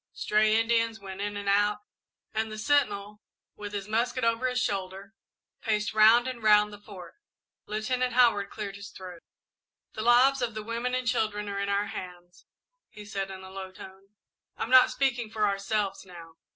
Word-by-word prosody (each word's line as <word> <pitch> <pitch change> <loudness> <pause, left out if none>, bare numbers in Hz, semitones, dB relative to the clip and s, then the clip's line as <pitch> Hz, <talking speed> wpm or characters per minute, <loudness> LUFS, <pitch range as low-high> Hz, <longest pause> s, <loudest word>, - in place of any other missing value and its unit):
Stray 215 +1 +2
Indians 230 0 +1
went 195 -1 -8
in 205 0 -3
and 205 0 -6
out, 205 +1 +2 0.5
and 220 0 -2
the 215 - -6
sentinel, 210 -6 0 0.3
with 205 -1 -7
his 200 -1 -5
musket 240 +3 -1
over 230 +2 +1
his 250 0 -1
shoulder, 195 -1 -3 0.5
paced 210 -2 -1
round 220 +3 +6
and 255 -2 -5
round 210 -1 +4
the 205 - -10
Fort. 190 -4 -12 0.5
Lieutenant 250 +4 -1
Howard 235 -5 +3
cleared 200 -2 -6
his 200 0 -9
throat. 180 -3 -10 0.7
"The 215 - -5
lives 250 +4 +4
of 230 -3 -2
the 215 - -5
women 235 +3 -2
and 255 -1 -3
children 215 -3 -1
are 200 0 -3
in 200 0 -2
our 200 +1 +1
hands," 180 -3 -10 0.4
he 210 - -12
said, 195 -2 -4
in 190 0 -9
a 190 - -11
low 190 -1 -7
tone. 190 +2 -14 0.4
"I'm 230 - -4
not 255 -1 +8
speaking 245 -4 -1
for 215 -1 0
ourselves, 200 0 -2
now. 170 -3 -13
210 Hz, 180 wpm, -28 LUFS, 200-230 Hz, 0.7 s, not